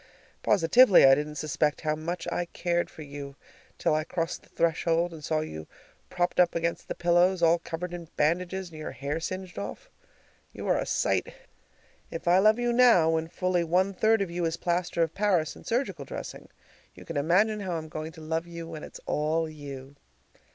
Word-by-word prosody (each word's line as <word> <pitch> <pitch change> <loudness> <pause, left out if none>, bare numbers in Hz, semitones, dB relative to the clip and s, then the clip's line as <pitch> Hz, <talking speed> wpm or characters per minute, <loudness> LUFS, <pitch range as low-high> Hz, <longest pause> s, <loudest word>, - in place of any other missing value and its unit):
Positively, 205 - +6
I 135 - +8
didn't 150 +2 -1
suspect 150 0 -1
how 155 -1 0
much 170 +3 -4
I 175 - -1
cared 175 0 -1
for 155 - -10
you 140 -1 -8 0.4
till - - +1
I 155 0 +1
crossed 165 +1 -3
the - - -23
threshold 170 +1 +1
and 155 -2 -10
saw 155 +1 0
you 80 - -7 0.4
propped 175 0 -1
up 175 -1 +4
against 170 0 -2
the - - -4
pillows, 175 +1 +3
all 165 +1 +5
covered 170 +1 -5
with 170 -2 -9
bandages, 180 +4 0
and 155 - -10
your 155 - -6
hair 145 +3 -3
singed 185 - -5
off. 100 - -7 0.6
You - - -7
are - - +3
a - - -3
sight! - - 0 0.8
If 165 +2 -7
I 180 +2 +6
love 215 +3 +5
you 240 0 0
now, 235 -10 +6
when 160 0 0
fully 180 0 0
one 185 +4 +1
third 220 +2 +3
of 180 - -6
you 175 0 -2
is 165 0 -1
plaster 175 -1 0
of 165 -1 -2
Paris 190 -7 +1
and - - -14
surgical 245 +4 -1
dressing, - - -8 0.5
you - - -13
can 165 - -7
imagine 185 +9 +2
how 190 -3 -3
I'm 160 -1 -4
going 155 +1 -6
to 160 - -12
love 160 +2 -2
you 170 -1 -7
when 160 -2 -7
it's - - -10
all 160 +2 0
you! 140 -3 -9
170 Hz, 195 wpm, -28 LUFS, 155-180 Hz, 0.8 s, I